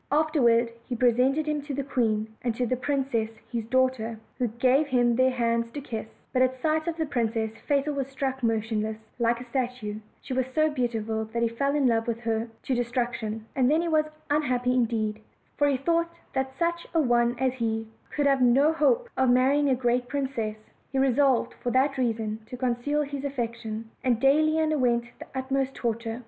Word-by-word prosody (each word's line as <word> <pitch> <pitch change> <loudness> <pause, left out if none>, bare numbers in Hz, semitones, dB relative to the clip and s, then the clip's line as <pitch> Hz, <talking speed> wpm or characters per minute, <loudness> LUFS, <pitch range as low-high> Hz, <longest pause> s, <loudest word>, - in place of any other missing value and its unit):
Afterward 260 -7 +3 0.2
he 245 - -1
presented 255 +5 +3
him 300 -1 -1
to 285 -1 -5
the 280 - -2
queen, 220 -5 0
and 240 -2 -1
to 245 - 0
the 255 - 0
princess 260 -4 -1 0.2
his 230 -3 -2
daughter, 250 -3 +1 0.2
who 250 - +2
gave 255 +6 +2
him 245 -3 +3
their 255 +2 +4
hands 235 -2 0
to - - -4
kiss; 225 -5 -5 0.3
but 255 - +2
at 255 0 +3
sight 315 +3 0
of 335 -1 -2
the 320 - 0
princess 225 -5 -1 0.2
Fatal 285 0 +1
was 275 -2 -2
struck 270 -1 -3
motionless 220 -1 0 0.2
like 235 0 +2
a - - -7
statue: 245 -4 -3 0.2
she - - -6
was 260 0 0
so 310 0 +3
beautiful 225 -4 -1
that 235 +2 -2
he - - +4
fell 275 +5 0
in 290 -2 +2
love 230 -2 +2
with 235 0 -2
her 225 0 -1 0.2
to 265 - -1
distraction; 240 -3 -2
and 255 -1 +3
then 310 +2 +4
he - - -1
was 310 -2 +3 0.3
unhappy 250 -4 +1
in 250 -2 +3
deed, 215 -2 -2 0.3
for 290 - +3
he 280 -2 +2
thought 335 +5 +1 0.2
that 265 0 -2
such 340 0 -1
a - - +5
one 240 -3 +3
as 260 0 +1
he 225 -3 -2 0.2
could 290 - -1
have 275 -2 +3
no 270 +6 +5
hope 460 +11 +2
of 260 -1 +3
marrying 270 +4 +4
a 260 - +4
great 245 0 0
princess: 260 -6 -2 0.3
he 270 - -2
resolved, 265 -1 +3
for 245 - -1
that 265 +2 +2
reason, 225 -3 -1
to 250 - -7
conceal 255 +4 0
his 280 -1 -5
affection, 235 -5 -4 0.2
and 245 -3 +2
daily 310 +4 +4
underwent 255 -7 +2 0.2
the - - -9
utmost 265 0 -1
torture. 230 0 -2
255 Hz, 195 wpm, -27 LUFS, 230-280 Hz, 0.3 s, a